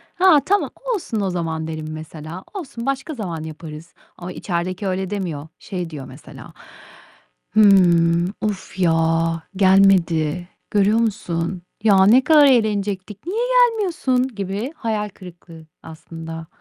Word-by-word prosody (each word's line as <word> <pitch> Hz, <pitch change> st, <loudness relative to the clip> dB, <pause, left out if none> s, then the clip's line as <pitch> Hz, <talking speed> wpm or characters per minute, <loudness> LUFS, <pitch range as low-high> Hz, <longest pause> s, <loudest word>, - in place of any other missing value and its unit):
"Ha, 365 Hz, -5 st, +6 dB
tamam, 405 Hz, +1 st, +1 dB, 0.3 s
olsun 225 Hz, -, -3 dB
o 195 Hz, -, 0 dB
zaman." 165 Hz, -3 st, -3 dB
derim, 155 Hz, -1 st, -5 dB
mesela, 155 Hz, +3 st, -8 dB
"Olsun, 275 Hz, -, -7 dB
başka 275 Hz, +4 st, -2 dB
zaman 175 Hz, -, -5 dB
yaparız." 160 Hz, +1 st, -9 dB, 0.2 s
ama 180 Hz, +1 st, -7 dB
içerideki 180 Hz, +2 st, -3 dB
öyle 190 Hz, 0 st, -2 dB
demiyor. 175 Hz, -8 st, -4 dB
Şey 180 Hz, -4 st, -5 dB
diyor 145 Hz, -4 st, -8 dB
mesela, -, -, -13 dB, 1.0 s
"Hımm, 175 Hz, -4 st, +5 dB
of 205 Hz, -3 st, -4 dB
ya 165 Hz, -1 st, +1 dB
gelmedi, 185 Hz, -4 st, +3 dB, 0.2 s
görüyor 205 Hz, +2 st, +3 dB
musun? 185 Hz, -6 st, -2 dB, 0.2 s
Ya, 195 Hz, -3 st, +5 dB
ne 250 Hz, +5 st, +6 dB
kadar 305 Hz, -2 st, +6 dB
eğlenecektik, 210 Hz, -, 0 dB
niye 390 Hz, +5 st, -2 dB, 0.3 s
gelmiyorsun" 325 Hz, -, 0 dB
gibi 205 Hz, +3 st, -4 dB
hayal 215 Hz, -5 st, -2 dB
kırıklığı 170 Hz, -4 st, -13 dB, 0.2 s
aslında. 165 Hz, 0 st, -9 dB
190 Hz, 125 wpm, -21 LUFS, 165-215 Hz, 1.0 s, Ha